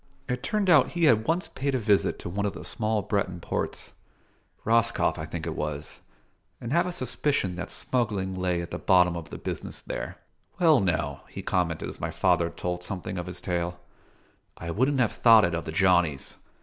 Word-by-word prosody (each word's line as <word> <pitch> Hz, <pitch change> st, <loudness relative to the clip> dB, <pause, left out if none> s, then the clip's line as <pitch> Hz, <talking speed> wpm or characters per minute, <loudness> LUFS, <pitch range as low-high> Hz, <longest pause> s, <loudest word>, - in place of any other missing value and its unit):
It 125 Hz, 0 st, -2 dB
turned 205 Hz, +8 st, 0 dB
out 160 Hz, -7 st, +5 dB
he 170 Hz, -1 st, -1 dB
had 115 Hz, -8 st, +5 dB
once 170 Hz, +4 st, +1 dB
paid 140 Hz, 0 st, -2 dB
a -, -, +3 dB
visit 105 Hz, -4 st, +2 dB
to -, -, -8 dB
one 100 Hz, +4 st, -1 dB
of 100 Hz, -, -3 dB
the -, -, -9 dB
small 110 Hz, -2 st, 0 dB
Breton 95 Hz, -3 st, -1 dB
ports: -, -, -4 dB, 0.7 s
Roscoff 115 Hz, -6 st, +2 dB
I 80 Hz, -, -5 dB
think 85 Hz, 0 st, -5 dB
it 80 Hz, -1 st, -3 dB
was, 75 Hz, 0 st, -4 dB, 0.6 s
and 120 Hz, +2 st, -4 dB
have 170 Hz, +2 st, +3 dB
a -, -, -2 dB
suspicion 130 Hz, -, -1 dB
that 90 Hz, -, -5 dB
smuggling 105 Hz, -7 st, -1 dB
lay 90 Hz, -2 st, -1 dB
at 85 Hz, -, -9 dB
the -, -, -4 dB
bottom 90 Hz, -2 st, +4 dB
of 80 Hz, -3 st, -7 dB
the -, -, -7 dB
business -, -, -5 dB
there. -, -, -5 dB, 0.4 s
"Well 160 Hz, -6 st, +6 dB
now," 75 Hz, -7 st, -1 dB
he -, -, -7 dB
commented 85 Hz, -3 st, -1 dB
as -, -, -8 dB
my -, -, -1 dB
father 85 Hz, 0 st, +2 dB
told 90 Hz, +1 st, -4 dB
something 95 Hz, 0 st, -4 dB
of 90 Hz, -, -5 dB
his 90 Hz, -1 st, -6 dB
tale, 85 Hz, -1 st, -2 dB, 0.8 s
"I 85 Hz, 0 st, -5 dB
wouldn' 130 Hz, -, +1 dB
have 120 Hz, -4 st, +2 dB
thought 115 Hz, -4 st, +6 dB
it 85 Hz, -, -1 dB
of 85 Hz, 0 st, -2 dB
the -, -, -4 dB
Johnnies. 85 Hz, -6 st, +2 dB
95 Hz, 200 wpm, -27 LUFS, 85-120 Hz, 0.8 s, Well